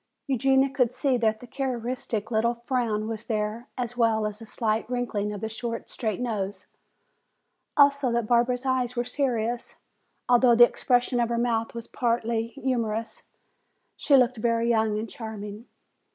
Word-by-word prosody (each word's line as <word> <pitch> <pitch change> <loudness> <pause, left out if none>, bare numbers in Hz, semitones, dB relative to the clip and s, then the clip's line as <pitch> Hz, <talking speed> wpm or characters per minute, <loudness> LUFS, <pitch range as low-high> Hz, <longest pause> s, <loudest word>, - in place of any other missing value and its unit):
Eugenia 270 0 +3
could 250 -2 0
see 265 0 +1
that 220 -2 +1
the - - -9
characteristic 245 -4 -3
little 235 +2 +2
frown 230 -5 0
was 220 -1 -5
there 215 +1 -2
as 245 -1 -3
well 225 -3 +2
as 210 0 -4
the 225 - -10
slight 220 0 -1
wrinkling 225 -5 -2
of 205 -1 -6
the 220 - -2
short, 230 +1 -5
straight 220 -3 -3
nose. 205 -5 -3 1.1
Also 280 -3 +5
that 235 -1 0
Barbara's 245 +2 +2
eyes 255 -1 0
were 240 - 0
serious, 240 -3 -2 0.5
although 245 -1 +5
the 240 +1 +9
expression 245 0 +1
of 235 -1 +1
her 235 - 0
mouth 235 -1 0
was 230 -1 -5
partly 230 -1 -1
humorous. 230 -4 -3 0.7
She 280 - +4
looked 250 -1 +3
very 230 +1 +1
young 220 -2 +2
and 220 +2 -3
charming. 220 -1 -8
235 Hz, 155 wpm, -26 LUFS, 220-250 Hz, 1.1 s, the